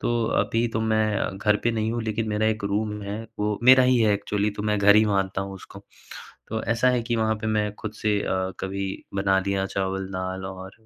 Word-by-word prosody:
तो - - -1 0.3
अभी 115 +1 +1
तो 115 0 -2
मैं 110 -3 0
घर 105 +1 +2
पे 120 - +3
नहीं 110 0 -1
हूँ, 120 -1 -2
लेकिन 110 0 -2
मेरा 105 +1 0
एक 110 -2 -1
रूम 105 +1 -1
है, 100 +1 -4 0.2
वो 105 0 0
मेरा 130 0 +8
ही 130 0 +4
है 110 -2 +4
एक्चुअली, 105 +1 -1
तो 105 0 -6
मैं 105 -1 0
घर 105 +1 +6
ही 110 - +6
मानता 95 -1 0
हूँ 95 0 -7
उसको। 95 - -12 0.7
तो 110 0 -3
ऐसा 125 +2 +3
है 125 -1 +1
कि 120 0 -1
वहाँ 110 -1 +1
पे 110 - -2
मैं 105 -1 0
खुद 110 - -6
से 105 -1 +1
अ, 95 0 -1
कभी 95 +1 -3 0.3
बना 95 0 +2
लिया 95 -1 0
चावल-दाल 95 -1 -3
और 95 0 -8
105 Hz, 220 wpm, -25 LUFS, 95-110 Hz, 0.7 s, मेरा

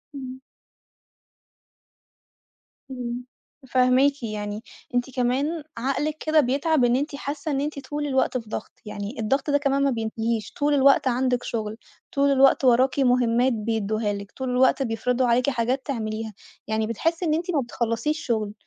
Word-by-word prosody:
إمم. 260 -1 -7 2.5
إمم 245 -1 -5 0.4
فاهماكِ، 255 +2 +3
يعني 210 -1 -4 0.3
أنتِ 245 +2 +1
كمان 275 +6 0
عقلِك 275 +5 -1
كده 310 0 +4
بيتعب 280 +1 +2
إن 240 - +3
أنتِ 285 +3 -2
حاسة 285 +2 -4
إن 275 -1 0
أنتِ 295 -1 -3
طول 295 0 -2
الوقت 265 -2 +1
في 225 -3 -8
ضغط، 220 - -5
يعني 210 +3 -6
الضغط 270 +7 0
ده 285 - +4
كمان 280 -1 +1
ما 280 - +3
بينتهيش 225 -1 -2
طول 290 0 +1
الوقت 275 -1 +5
عندِك 250 0 +1
شغل، 220 -2 -4 0.3
طول 280 0 +2
الوقت 270 0 +4
وراكِ 255 +3 +4
مُهمات 245 -1 +3
بيدُّوها 215 -1 -1
لِك، 200 0 -7
طول 260 -1 -4
الوقت 260 +2 +3
بيفرضوا 245 +2 0
عليكِ 245 +3 +3
حاجات 255 +1 -1
تعمليها 220 -4 -3 0.3
يعني 220 0 0
بتحسّي 330 - -1
إن 310 - +2
أنتِ 340 +3 -1
ما 295 -5 +1
بتخلّصيش 235 +5 -2
شغل، 215 -4 -1
255 Hz, 150 wpm, -24 LUFS, 230-280 Hz, 2.5 s, الوقت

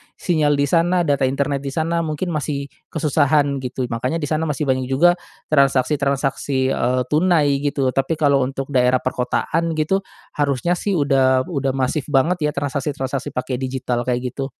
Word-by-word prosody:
sinyal 150 -4 +1
di 140 - +1
sana 175 +4 +2
data 140 -4 +1
internet 140 +1 -1
di 140 - -7
sana 165 +1 0
mungkin 165 +2 -2
masih 140 -2 -3 0.2
kesusahan 145 -2 +1
gitu 130 0 -4
makanya 125 +6 -1
di 160 -2 -3
sana 155 +1 0
masih 150 +1 -2
banyak 130 -2 0
juga 145 +7 +4 0.4
transaksi-transaksi, 140 -1 +1
eee, 125 +1 +1
tunai 150 -4 +3
gitu 140 -2 0
tapi 135 +5 0
kalau 145 -3 +3
untuk 135 +1 -5
daerah 125 -1 +2
perkotaan 160 +6 -1
gitu 155 +5 +1 0.4
harusnya 145 +3 +1
sih 200 -2 -1
udah 135 -4 +3
udah 135 -4 -1
masif 135 +2 -1
banget 150 +3 +2
ya - - -1
transaksi-transaksi 140 -1 -3
pakai 125 0 -2
digital 125 -2 -2
kayak 125 0 -1
gitu. 135 - -4
140 Hz, 160 wpm, -20 LUFS, 130-155 Hz, 0.4 s, juga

